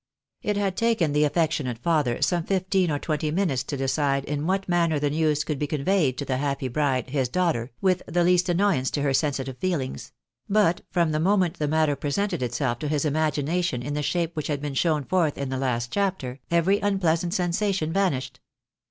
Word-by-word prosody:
It 210 -1 -1
had 195 -2 0
taken 225 -10 +1
the 150 +1 +3
affectionate 150 -5 0
father 145 -2 0
some 175 -2 +1
fifteen 190 0 +1
or 145 - 0
twenty 155 0 -2
minutes 155 -6 0
to 140 - -4
decide 140 +1 0
in 150 +2 -2
what 195 +1 0
manner 170 -3 +2
the 145 0 0
news 155 -1 +1
could 150 -3 -3
be 150 - -1
conveyed 150 -2 +1
to 140 - -3
the 130 -1 -1
happy 140 -1 -1
bride, 130 -2 0
his 135 -4 0
daughter, 160 -8 0
with 185 -2 +2
the 175 +1 +1
least 180 +1 +3
annoyance 175 -7 +2
to 145 - -2
her 140 -2 +1
sensitive 135 -3 -1
feelings; 160 -9 -3 0.4
but 200 -4 +3
from 170 -3 +1
the 155 - 0
moment 185 0 +2
the 150 - 0
matter 155 -1 +2
presented 170 +6 -2
itself 120 0 -1
to 150 - -3
his 150 0 0
imagination 155 -1 0
in 145 +3 -4
the 150 - -1
shape 170 +2 -1
which 155 - -3
has 150 - -1
been 145 0 -5
shown 150 +1 +1
forth 165 -1 +1
in 140 -1 -3
the 130 -1 -2
last 120 -3 -1
chapter, 185 -11 -2
every 170 +4 +3
tmpleasant 175 -4 +1
sensation 175 -2 0
vanished. 130 -10 -1
155 Hz, 195 wpm, -25 LUFS, 140-180 Hz, 0.4 s, the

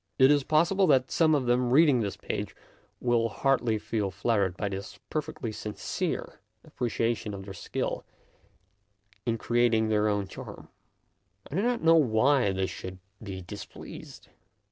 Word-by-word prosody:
It 130 +2 +7
is 145 -2 +3
pos 155 +5 +3
sible 195 -2 +3
that 130 -3 +3
some 160 -2 +4
of 135 -3 0
them 120 0 +2
reading 140 -1 +5
this 100 -3 -3
page - - -4 0.4
will 120 -2 +2
hardly 120 -2 +1
feel 105 -1 -2
flattered 95 -1 0
by 105 - -1
this 100 0 -6
perfectly 155 -5 -3
sincere 105 0 -4 0.2
appreciation 115 -6 -2
of 95 -1 -8
their 100 - -7
skill - - -3 1.2
in 115 -1 +1
creat 120 +1 +2
ing 110 0 +1
their 105 0 +2
own 100 -1 0
charm. - - -10 0.8
I - - -7
do 185 - +1
not 240 -1 0
know 165 0 +6
why 125 -3 +3
they 95 0 0
should 95 0 -7 0.2
be 95 -3 -6
displeased. 85 - -10
120 Hz, 155 wpm, -28 LUFS, 105-145 Hz, 1.2 s, It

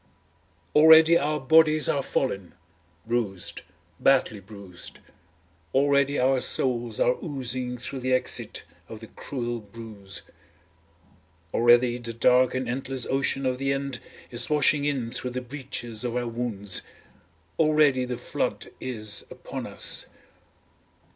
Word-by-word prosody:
Already 160 +2 +8
our 150 -1 +1
bodies 155 +2 +4
are 140 - +1
fallen, 100 -10 -2 0.5
bruised, 110 -6 -2 0.4
badly 130 -6 +3
bruised, 100 -3 -10 0.8
already 140 0 +3
our 130 0 +2
souls 120 -3 0
are 125 - +4
oozing 130 -4 -3
through 130 +2 -5
the 130 0 -2
exit 130 - 0 0.3
of 110 - -8
the 115 - -10
cruel 120 0 -5
bruise. 105 -2 -9 1.3
Already 120 +1 +4
the 115 -1 -6
dark 125 +2 +3
and 130 -1 -2
endless 130 0 -2
ocean 135 0 0
of 130 0 0
the 135 0 0
end 135 -2 -3 0.3
is 120 0 +1
washing 150 -1 +3
in 130 -5 -1
through 125 - -3
the 125 +1 -3
breaches 125 -4 -6
of 120 -1 -3
our 120 -1 -1
wounds, 115 -4 -3 0.8
Already 150 -4 +4
the 125 -1 -4
flood - - -3
is 110 -5 -3
upon - - -7
us. - - -1
125 Hz, 125 wpm, -26 LUFS, 115-135 Hz, 1.3 s, Already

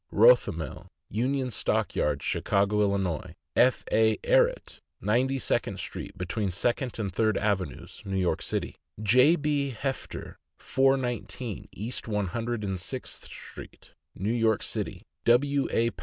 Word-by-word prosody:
Rothemel, 105 -7 +3 0.2
Union 130 +4 0
Stock - - 0
Yards, 70 -2 0
Chicago, 100 +1 +2
111.; 95 -5 -2 0.2
F. 125 +1 +4
A. 110 0 +4
Ehret, - - +2 0.2
Ninety 130 +5 +1
second 130 - 0
street, - - -6
between 105 -3 -2
Second 120 +7 0
and 100 -5 -3
Third 110 +1 +2
avenues, 95 -9 -2
New 95 -1 -2
York 90 -4 +1
City; - - -3 0.3
J. 130 +9 +6
B. 145 -3 0
Hefter, 135 -1 -4 0.2
419 130 -4 0
East 115 +4 -4
One 105 -2 0
Hundred 115 +3 -3
and 95 -2 -2
Sixth 125 +8 -5
street, - - -11 0.2
New 105 +5 -1
York 115 -3 +2
City; - - -3 0.2
W. 140 +3 +3
A. 115 +1 +2
115 Hz, 130 wpm, -28 LUFS, 100-130 Hz, 0.3 s, J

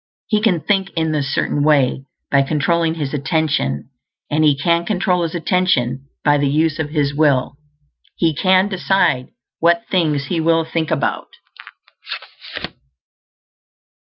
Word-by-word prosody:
He 215 -2 0
can 190 -7 +2
think 195 +1 0
in 160 -1 0
this 140 -3 -1
Certain 145 - 0
Way 140 -3 +2 0.3
by 140 - +4
controlling 160 +3 0
his 145 -3 -4
attention, 140 - -1 0.4
and 155 +1 +2
he 145 -2 +4
can 170 +4 +1
control 180 -1 0
his 165 0 -3
attention 140 -7 0 0.2
by 145 0 +4
the 140 - +1
use 155 +2 +1
of 155 -2 -2
his 145 -2 0
will. 140 -4 +2 0.6
He 165 -2 +1
can 185 +5 +3
decide 190 -9 +1 0.3
what 170 0 +3
things 155 -6 +1
he 165 +5 -2
will 165 0 +2
think 160 -1 -2
about. - - -1
160 Hz, 135 wpm, -19 LUFS, 140-170 Hz, 0.6 s, by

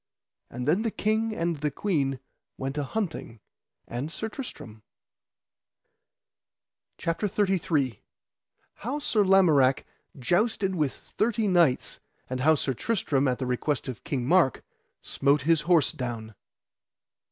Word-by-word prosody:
And 125 +2 -5
then 180 +7 +3
the 225 - 0
king 220 +1 0
and 170 -3 -1
the 150 +1 -1
queen 140 -5 -1 0.4
went 135 +1 -4
a 145 - -1
hunting, 165 - -4 0.5
and 130 +7 -4
Sir 220 +6 -4
Tristram. 115 - -8 2.2
CHAPTER 165 +5 -1
XXXIII. 175 - 0 0.7
How 250 +7 -4
Sir 225 -8 +1
Lamorak 160 -9 +4 0.3
jousted 190 - +1
with 150 -6 0
thirty 220 -1 -1
knights, 170 -9 +2 0.3
and 130 0 -3 0.2
Sir 135 - -1
Tristram 145 - 0
at 125 -1 +1
the 130 - -3
request 130 +4 -1
of 125 -5 -6
King 130 -4 -2
Mark 170 -3 +3 0.4
smote 140 0 +1
his 165 +1 +3
horse 160 -5 +3
down. 115 -3 -5
155 Hz, 120 wpm, -27 LUFS, 130-195 Hz, 2.2 s, Lamorak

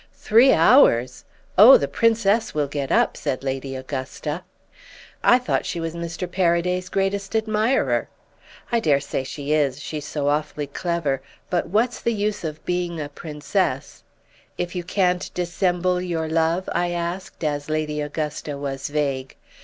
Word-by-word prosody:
"'Three 235 +5 +5
hours! 160 - +4 0.3
Oh 235 +7 +10
the 140 - -2
Princess 225 -1 +2
will 150 -2 +1
get 140 -1 -4
up!' - - +3
said 130 - -3
Lady 135 0 -3
Augusta. 130 +4 -5 0.8
"'I 245 - +6
thought 250 - -1
she 170 - -3
was 165 -1 -3
Mr. 170 +1 -5
Paraday's 180 0 0
greatest 195 +2 -1
admirer.' 220 +3 +1 0.6
"'I 235 - +3
dare 150 -9 +3
say 140 -1 -3
she 145 +2 -3
is—she's 150 +1 -1
so 145 -2 -2
awfully 150 0 -1
clever. 150 -2 -2 0.3
But 175 - 0
what's 230 +6 +1
the 235 - 0
use 210 -1 -2
of 155 -1 -6
being 175 -2 -2
a 145 -1 -4
Princess—' 150 0 -3 0.5
"'If 175 0 -3
you 180 -2 -3
can't 180 0 0
dissemble 180 0 0
your 170 -3 -2
love?' 165 +3 +1
I 175 - 0
asked 175 +1 -4
as 145 -1 -2
Lady 155 -1 -1
Augusta 150 -1 -4
was 140 -1 -4
vague. 140 -3 -2
165 Hz, 145 wpm, -23 LUFS, 145-185 Hz, 0.8 s, Oh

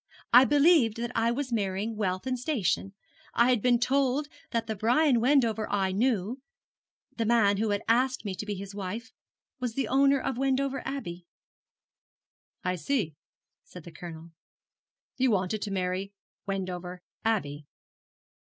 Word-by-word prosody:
'I 250 +2 +9
believed 290 -5 +4
that 235 +1 -3
I 230 0 +2
was 255 +1 -2
marrying 205 +1 -1
wealth 185 -1 -2
and 255 -1 -1
station. 205 - -1 0.4
I 240 +2 +5
had 245 -4 +2
been 245 +1 +4
told 270 +3 +1 0.2
that 230 -1 -1
the 220 - -3
Brian 245 +5 +3
Wendover 230 -5 +2
I 195 -2 +1
knew 225 +3 0 0.8
the 230 - 0
man 215 -4 +4
who 215 +1 0 0.2
asked 255 +2 +2
me 200 - -2
to 185 - -5
be 205 - -2
his 200 +1 -8
wife 205 +5 -6 0.5
was 245 -3 -3
the 270 -4 -1
owner 275 +2 +4
of 255 -1 -3
Wendover 270 0 0
Abbey.' 180 -11 -6 1.4
'I 180 0 -1
see,' 170 - -1 0.5
said 180 - -12
the 170 - -11
Colonel; 165 -1 -10 0.9
'you 260 0 +3
wanted 200 0 0
to 210 - -3
marry 190 +1 -2 0.3
Wendover 180 -2 -4 0.2
Abbey.' 150 -10 -1
225 Hz, 145 wpm, -28 LUFS, 190-255 Hz, 1.4 s, I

